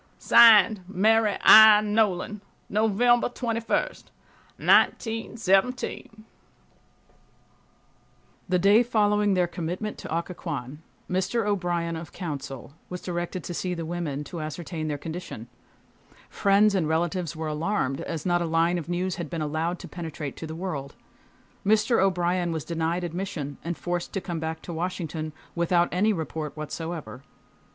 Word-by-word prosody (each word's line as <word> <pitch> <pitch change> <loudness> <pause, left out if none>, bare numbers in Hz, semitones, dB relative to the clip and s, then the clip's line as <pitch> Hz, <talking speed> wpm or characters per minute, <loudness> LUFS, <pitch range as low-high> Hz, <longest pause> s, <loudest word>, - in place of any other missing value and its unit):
(Signed) 220 -3 +7
MARY 210 +2 +2
I. 220 -1 +10
NOLAN. 210 -1 0 0.3
November 225 +4 +3
21, 230 -2 -1 0.8
1917, 225 0 +1 2.2
The 180 - +3
day 200 +5 +5
following 210 -3 +2
their 180 -1 +3
commitment 175 +5 -5
to - - -8
Occoquan 150 -5 -5 0.3
Mr. 190 +5 -1
O'Brien, 175 -4 -1
of 160 -1 -8
counsel, 140 -5 -6 0.2
was 180 - -5
directed 175 0 -4
to 175 - -5
see 180 +1 -3
the 165 -1 -5
women, 160 -4 -3
to 165 +2 -7
ascertain 155 +1 -5
their 150 -1 -2
condition. 160 -7 -7 0.8
Friends 200 +1 +3
and 175 -6 0
relatives 170 0 -1
were 160 0 -4
alarmed, 155 -3 -1
as 160 -3 -5
not 175 -1 +2
a - - 0
line 165 +2 +1
of 170 - -9
news 180 +1 -2
had 170 -4 -5
been 165 -2 -3
allowed 160 +4 -2
to - - -10
penetrate 160 -5 -6
to 160 - -6
the 160 - -7
world. 155 -6 -5 0.7
Mr. 215 +3 +3
O'Brien 180 -2 +1
was 160 -3 -4
denied 170 +1 -2
admission 170 -5 -5
and 170 0 -4
forced 175 -1 -3
to 195 - -1
come 175 -3 -5
back 160 0 -5
to 175 - -7
Washington 165 -2 -4 0.2
without 170 0 +2
any 200 +5 +2
report 160 -4 -4
whatsoever. 155 -6 -6
175 Hz, 135 wpm, -26 LUFS, 160-200 Hz, 2.2 s, I